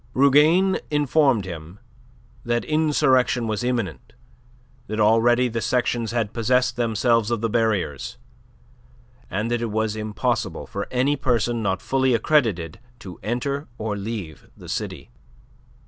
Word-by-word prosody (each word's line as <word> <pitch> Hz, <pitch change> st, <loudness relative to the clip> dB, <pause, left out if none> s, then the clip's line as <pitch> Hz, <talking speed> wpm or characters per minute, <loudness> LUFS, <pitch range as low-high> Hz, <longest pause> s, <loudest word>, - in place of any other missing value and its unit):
Rougane 150 Hz, +8 st, +4 dB
informed 145 Hz, -6 st, +2 dB
him 85 Hz, 0 st, -8 dB, 0.7 s
that 120 Hz, 0 st, -1 dB
insurrection 145 Hz, -6 st, +2 dB
was 110 Hz, 0 st, -2 dB
imminent, 115 Hz, -, -3 dB, 0.7 s
that 110 Hz, +1 st, -4 dB
already 115 Hz, +3 st, +4 dB
the 115 Hz, -1 st, -3 dB
sections 120 Hz, -2 st, 0 dB
had 115 Hz, -3 st, -2 dB
possessed 125 Hz, +1 st, +1 dB
themselves 115 Hz, -1 st, +1 dB
of 120 Hz, -3 st, -1 dB
the 115 Hz, -, 0 dB
barriers, 105 Hz, -, -1 dB, 1.1 s
and 110 Hz, +5 st, -2 dB
that 120 Hz, -1 st, 0 dB
it 115 Hz, -, -2 dB
was 110 Hz, 0 st, -1 dB
impossible 110 Hz, -1 st, -2 dB
for 100 Hz, -, -5 dB
any 130 Hz, +3 st, +1 dB
person 120 Hz, -3 st, 0 dB
not 95 Hz, -2 st, -1 dB
fully 130 Hz, -2 st, +2 dB
accredited 110 Hz, -, +1 dB, 0.2 s
to 95 Hz, -7 st, -10 dB
enter 140 Hz, +6 st, -2 dB
or 105 Hz, -1 st, -3 dB
leave 100 Hz, -7 st, -6 dB
the -, -, -12 dB
city. -, -, -5 dB
115 Hz, 130 wpm, -23 LUFS, 105-130 Hz, 1.1 s, Rougane